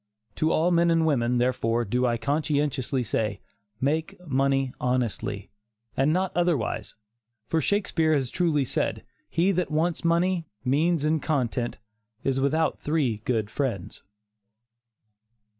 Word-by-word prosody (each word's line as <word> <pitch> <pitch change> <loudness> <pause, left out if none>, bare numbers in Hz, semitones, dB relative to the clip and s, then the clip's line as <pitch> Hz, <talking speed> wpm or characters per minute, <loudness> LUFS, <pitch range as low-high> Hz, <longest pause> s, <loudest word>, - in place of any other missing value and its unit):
To 155 +1 +2
all 170 +3 +2
men 170 0 +4
and 165 -1 +3
women, 125 -5 +2
therefore, 120 -1 +1
do 125 +5 +1
I 120 -1 +1
conscientiously 140 -1 0
say, 105 -3 -1 0.4
make 155 +6 -1
money 135 -2 +1
honestly, 120 -5 -1 0.4
and 135 +3 +3
not 185 +2 +1
otherwise, 170 -10 0 0.5
for 160 - 0
Shakespeare 165 -4 +1
has 135 -4 -1
truly 160 -6 +1
said, - - -2 0.3
"He 175 +4 +2
that 180 -1 0
wants 160 +2 0
money, 170 0 +1 0.2
means 155 +4 +2
and 155 0 +1
content, 125 -5 -1 0.5
is 135 -1 +1
without 155 +4 +1
three 145 -8 0
good 110 -4 0
friends." 120 -11 -3
145 Hz, 125 wpm, -26 LUFS, 125-165 Hz, 0.5 s, men